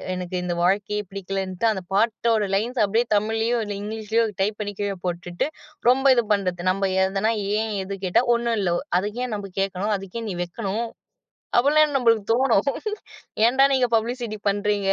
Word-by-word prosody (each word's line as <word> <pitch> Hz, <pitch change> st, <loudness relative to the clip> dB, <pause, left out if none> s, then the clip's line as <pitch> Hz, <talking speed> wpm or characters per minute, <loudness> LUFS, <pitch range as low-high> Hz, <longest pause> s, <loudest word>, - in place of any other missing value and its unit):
எனக்கு 180 Hz, 0 st, -5 dB
இந்த 175 Hz, -1 st, -2 dB
வாழ்க்கையே 205 Hz, +3 st, +1 dB
பிடிக்கலன்டு 195 Hz, 0 st, -3 dB
அந்தப் 190 Hz, -3 st, -6 dB
பாட்டோட 220 Hz, -1 st, +2 dB
லைன்ஸு 235 Hz, +4 st, 0 dB
அப்டியே 225 Hz, +4 st, +1 dB
தமிழ்லையோ, 225 Hz, +3 st, +1 dB, 0.2 s
இங்கிலீஷ்லையோ 220 Hz, +2 st, -1 dB, 0.2 s
டைப் 210 Hz, +2 st, 0 dB
பண்ணிக் 205 Hz, -1 st, -5 dB
கீழ 200 Hz, -1 st, -1 dB
போட்டுட்டு, 175 Hz, +4 st, -2 dB, 0.4 s
ரொம்ப 265 Hz, +2 st, +3 dB
இது 240 Hz, -2 st, +2 dB
பண்றது. 180 Hz, -3 st, -1 dB
நம்ம 195 Hz, 0 st, -1 dB
எதுனா 195 Hz, +4 st, 0 dB, 0.3 s
ஏன்? 220 Hz, 0 st, -1 dB
எதுக்கு? 190 Hz, -1 st, -4 dB, 0.2 s
ஒண்ணும் 235 Hz, -1 st, 0 dB
இல்ல. 185 Hz, -3 st, +1 dB, 0.3 s
அதுக்கு 210 Hz, +4 st, -4 dB
ஏன் 225 Hz, -4 st, -3 dB
நம்ப 200 Hz, -1 st, -7 dB
கேக்கணும்? 195 Hz, +2 st, -1 dB
அதுக்கு 195 Hz, +3 st, -7 dB
ஏன் 225 Hz, -, -4 dB
நீ -, -, -4 dB
வெக்கணும்? 205 Hz, +5 st, -3 dB, 0.7 s
அப்டின்னு 295 Hz, +3 st, +4 dB
நம்மளுக்குத் 230 Hz, -4 st, +2 dB
தோணும். 255 Hz, 0 st, +3 dB, 0.8 s
ஏன்டா 265 Hz, +3 st, +5 dB
நீங்கப் 250 Hz, -3 st, +2 dB
பப்ளிசிட்டி 230 Hz, -1 st, -2 dB
பண்றீங்க? 200 Hz, -1 st, 0 dB
210 Hz, 155 wpm, -23 LUFS, 195-230 Hz, 0.8 s, ஏன்டா